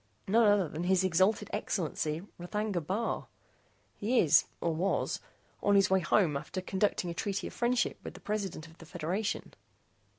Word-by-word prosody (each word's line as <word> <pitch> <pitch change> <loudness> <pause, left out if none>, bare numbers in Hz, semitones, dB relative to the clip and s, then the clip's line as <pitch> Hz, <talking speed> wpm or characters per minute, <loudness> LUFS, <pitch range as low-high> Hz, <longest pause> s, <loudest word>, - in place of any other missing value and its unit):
None 220 +3 +5
other 205 -4 +4
than 155 +4 -4
His 190 0 +3
Exalted 190 +4 +2
Excellency, 165 -5 -2 0.2
R'thagna 200 +1 -2
Bar. 200 +9 -2 0.7
He 235 +5 0
is 155 - +5
or 170 - 0
was 180 +5 0 0.4
on 205 0 +3
his 195 -1 +4
way 190 - +5
home 175 -3 +2
after 150 +6 -4
concluding 190 -1 0
a - - -4
treaty 195 +3 -2
of - - -6
friendship 240 0 0
with - - -7
the - - -10
President 200 -6 -3
of 165 0 -16
the 165 - -12
Federation." 180 +6 -3
190 Hz, 165 wpm, -31 LUFS, 170-210 Hz, 0.7 s, None